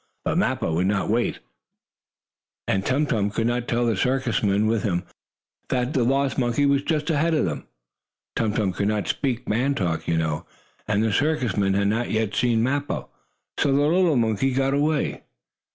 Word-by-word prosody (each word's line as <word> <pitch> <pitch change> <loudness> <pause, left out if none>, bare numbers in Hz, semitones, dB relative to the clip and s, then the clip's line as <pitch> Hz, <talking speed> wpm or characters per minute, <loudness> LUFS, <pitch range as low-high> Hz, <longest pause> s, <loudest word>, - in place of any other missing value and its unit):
But - - +1
Mappo 80 - 0
would 90 +3 +1
not 105 0 0
wait, 120 +2 0 1.3
and 95 -1 +1
Tum 135 +7 +1
Tum 105 -7 0
could 110 +2 -2
not 120 0 -1
tell 120 0 +1
the 115 -2 +1
circus 130 +3 0
men 100 0 +2
with 110 -1 +1
him 90 -4 -1 0.7
that 125 +2 0
the 130 -6 +2
lost 135 +1 +1
monkey 125 +3 +1
was 140 0 +3
just 150 0 -1
ahead 160 +2 +1
of 150 - +2
them. 80 -5 -4 0.7
Tum 110 -2 0
Tum 100 -4 0
could 100 +2 -1
not 105 -1 -1
speak 135 -3 -2
man 125 +6 +1
talk, 85 -6 -2
you 85 - +1
know, 80 -2 -2 0.4
and 105 0 +1
the 110 -2 +1
circus 145 -9 +1
men 95 -1 +1
had 100 0 +2
not 115 +3 -1
yet 110 -1 -1
seen 115 -2 +2
Mappo. 140 +3 -2 0.5
So 140 - +2
the 135 - +3
little 170 +1 +3
monkey 115 +3 +1
got 135 0 +1
away. 150 +1 0
120 Hz, 185 wpm, -24 LUFS, 105-140 Hz, 1.3 s, was